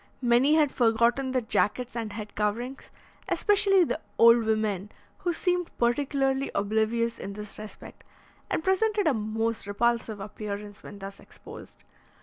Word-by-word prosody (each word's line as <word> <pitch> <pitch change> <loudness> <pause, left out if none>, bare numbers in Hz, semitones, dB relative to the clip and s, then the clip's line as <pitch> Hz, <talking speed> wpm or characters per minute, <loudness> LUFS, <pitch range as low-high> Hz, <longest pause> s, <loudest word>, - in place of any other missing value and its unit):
Many 245 +5 +4
had 300 -3 +3
forgotten 235 +3 +2
their 255 -2 0
jackets 235 +2 0
and 225 -3 -3
head 210 0 -7
coverings, 230 +6 -3 0.4
especially 395 -2 +4
the 315 - -2 0.2
old 230 0 +6
women, 215 -2 -1 0.3
who 355 - -1
seemed 355 0 -1
particularly 270 +2 +1
oblivious 220 +3 0
in 200 - -6
this 210 0 -8
respect, 215 0 -10 0.5
and - - -1
presented 410 +2 +1
a 300 - +4
most 220 -1 -2
repulsive 225 0 0
appearance 205 0 -7
when 205 - -10
thus 195 0 -9
exposed. - - -13
235 Hz, 135 wpm, -27 LUFS, 210-270 Hz, 0.5 s, old